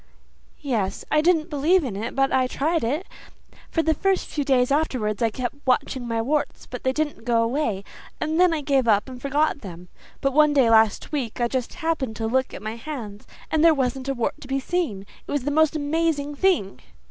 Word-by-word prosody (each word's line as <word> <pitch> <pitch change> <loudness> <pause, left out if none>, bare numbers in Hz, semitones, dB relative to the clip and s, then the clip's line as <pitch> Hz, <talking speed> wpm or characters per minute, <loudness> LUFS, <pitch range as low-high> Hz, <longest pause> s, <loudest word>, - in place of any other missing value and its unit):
"Yes. 220 -10 -2
I 305 - +4
didn't 330 -1 +2
believe 315 +5 +3
in 240 -8 -4
it 220 +4 -4
but 270 0 +2
I 260 -1 +3
tried 315 +5 0
it. 290 +11 -1 0.6
For 325 - 0
the 320 - +2
first 385 +4 0
few 295 - -3
days 260 -2 +2
afterwards 255 -8 0
I 230 - +3
kept 250 +4 -4
watching 255 -1 0
my 230 -1 -1
warts, 295 +4 -1
but 250 - -7
they 260 - +2
didn't 295 -3 -2
go 230 -1 +2
away, 230 -5 -1 0.4
and 315 +2 -1
then 360 -1 +5
I 320 -2 -1
gave 275 -4 +1
up 210 +1 +3
and 255 -1 -9
forgot 285 +2 0
them. 180 -3 -10 0.3
But 275 -1 0
one 300 0 +5
day 260 -5 +4
last 220 -2 +3
week 265 -6 -3
I 240 - +2
just 250 0 -3
happened 320 -9 -2
to 225 - -3
look 260 +3 0
at - - -9
my 220 +2 -4
hands 230 -7 -7 0.2
and 315 0 +2
there 330 -2 +6
wasn't 265 0 -1
a 275 - -1
wart 240 - -2
to - - -10
be 270 +1 0
seen. 265 - -2 0.2
It - - -6
was 290 -3 -1
the 290 - -1
most 315 +1 +3
amazing 295 -1 0
thing." 285 - +1
270 Hz, 215 wpm, -24 LUFS, 230-310 Hz, 0.6 s, there